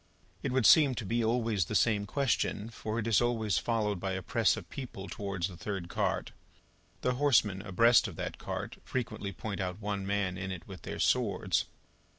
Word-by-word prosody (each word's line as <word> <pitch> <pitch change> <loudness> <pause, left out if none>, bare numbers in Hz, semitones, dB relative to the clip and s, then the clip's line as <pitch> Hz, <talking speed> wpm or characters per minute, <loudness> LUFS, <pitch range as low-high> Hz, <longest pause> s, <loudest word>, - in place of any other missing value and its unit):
It - - -2
would 130 -3 +2
seem 145 -5 +7
to 115 - -4
be 115 +4 0
always 110 -5 +1
the 110 - -4
same 105 -3 +2
question, 115 -5 0
for, 110 0 -4
it 115 - -1
is 115 -1 +4
always 115 -4 +1
followed 105 -5 0
by 95 +1 -2
a 95 0 -3
press - - +2
of - - -8
people 120 -7 -7
towards 100 -4 -3
the 95 - -10
third 90 0 -5
cart. - - -1 0.7
The 125 - +1
horsemen 105 -9 +3
abreast 115 +6 +4
of - - -8
that - - -5
cart, - - -5
frequently 115 -5 -3
point 100 0 -5
out 90 +1 -3
one 100 -2 -3
man 100 -2 -1
in 95 0 -4
it 90 -3 -7
with 95 -5 -9
their - - -6
swords. 100 -7 +1
105 Hz, 190 wpm, -31 LUFS, 95-115 Hz, 0.7 s, seem